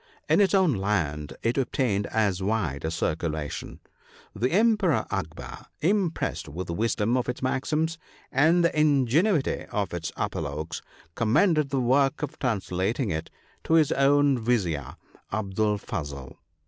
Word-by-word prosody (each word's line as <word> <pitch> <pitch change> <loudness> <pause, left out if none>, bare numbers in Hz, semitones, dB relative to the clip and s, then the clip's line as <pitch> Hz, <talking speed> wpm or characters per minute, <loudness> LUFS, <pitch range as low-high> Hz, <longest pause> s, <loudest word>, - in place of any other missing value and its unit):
In - - +4
its 200 0 +3
own 185 -6 +4
land 85 -8 -1
it 115 +4 +1
obtained 120 -6 0
as 100 -4 0
wide 95 -9 -1
a - - 0
circulation. 80 -2 -3 0.5
The 120 +5 0
Emperor 210 -5 +3
Akbar, 85 -5 -5
impressed 185 0 0
with 90 +5 -5
the 85 - -4
wisdom 115 +3 0
of 125 -1 0
its 125 - -4
maxims 155 +5 0 0.3
and 165 +5 +4
the 170 - +1
in 150 -4 +4
genuity 160 - +1
of 100 -4 -2
its 85 -2 -3
apologues, 80 +3 -3 0.3
commended 150 - +2
the 135 - 0
work 135 +4 +2
of 150 - -5
trans 115 -7 -1
lating 100 +6 -1
it 80 +1 -3 0.4
to - - +1
his 155 -3 +4
own 140 -1 +3
Vizier, 90 - -1 0.4
Abdul 105 +1 0
Fazel. 70 -8 -6
115 Hz, 145 wpm, -26 LUFS, 90-145 Hz, 0.5 s, In